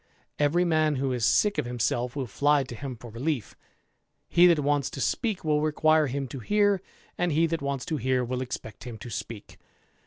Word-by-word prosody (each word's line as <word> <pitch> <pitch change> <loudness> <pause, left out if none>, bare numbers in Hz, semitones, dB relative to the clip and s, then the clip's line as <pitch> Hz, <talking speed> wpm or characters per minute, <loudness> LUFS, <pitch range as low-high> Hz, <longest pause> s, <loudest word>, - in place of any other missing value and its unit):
Eveif 155 +5 +3
man 155 -3 +2
who 135 0 -1
is 120 -2 -2
sick 205 - +3
of 150 - -1
himself 120 0 -1
will 135 -2 -2
fiy 140 +5 +2
to 125 - -8
him 130 +2 -6
for 120 0 -11
relief; 125 0 -3 0.7
he 175 +1 +6
that 170 -2 +5
wants 145 -2 +1
to - - -8
speak 210 - -1
will 150 -1 +2
requure 155 0 +3
him 135 +1 -3
to 135 - -6
hear; 205 - +2 0.4
and 175 -1 +1
he 160 +3 +3
that 165 -1 -2
wants 140 -2 -3
to 155 - -2
hear 130 0 0
will 125 +1 -3
expect 125 -4 -6
him 120 -3 -7
to 120 +1 -9
speak. 110 -1 -7
140 Hz, 205 wpm, -27 LUFS, 125-160 Hz, 0.7 s, he